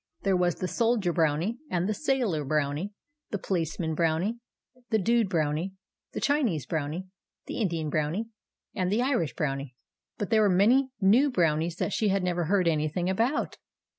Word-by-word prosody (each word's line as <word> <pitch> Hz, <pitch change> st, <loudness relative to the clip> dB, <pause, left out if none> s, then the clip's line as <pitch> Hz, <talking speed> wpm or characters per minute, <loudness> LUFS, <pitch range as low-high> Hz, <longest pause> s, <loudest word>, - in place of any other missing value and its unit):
There 195 Hz, -1 st, +2 dB
was 180 Hz, -2 st, +2 dB
the 185 Hz, -, -3 dB
Soldier 225 Hz, -5 st, +1 dB
Brownie, 165 Hz, +7 st, +1 dB
and 180 Hz, +1 st, 0 dB
the 215 Hz, -, +1 dB
Sailor 235 Hz, -, 0 dB
Brownie, 150 Hz, +6 st, -1 dB, 0.4 s
the 205 Hz, -, -2 dB
Policeman 165 Hz, -3 st, -2 dB
Brownie, 170 Hz, +8 st, 0 dB, 0.5 s
the 220 Hz, -, +3 dB
Dude 225 Hz, 0 st, +2 dB
Brownie, 160 Hz, +2 st, 0 dB, 0.4 s
the -, -, -3 dB
Chinese 245 Hz, -, +1 dB
Brownie, 160 Hz, +5 st, -3 dB, 0.4 s
the -, -, -5 dB
Indian 165 Hz, -8 st, -1 dB
Brownie, 155 Hz, +9 st, 0 dB, 0.5 s
and 185 Hz, -2 st, -1 dB
the 225 Hz, +4 st, +2 dB
Irish 250 Hz, -, 0 dB
Brownie; 135 Hz, -3 st, -3 dB, 0.4 s
but 205 Hz, -, -4 dB
there 220 Hz, -1 st, +5 dB
were 210 Hz, -, +4 dB
many 235 Hz, +9 st, +4 dB
new 225 Hz, +9 st, +5 dB
Brownies 165 Hz, -, +1 dB
that 195 Hz, -, -2 dB
she 215 Hz, -, +1 dB
had 195 Hz, -1 st, +1 dB
never 175 Hz, -1 st, 0 dB
heard 185 Hz, +1 st, +2 dB
anything 160 Hz, +3 st, 0 dB
about. 235 Hz, +9 st, 0 dB
180 Hz, 165 wpm, -28 LUFS, 160-215 Hz, 0.5 s, there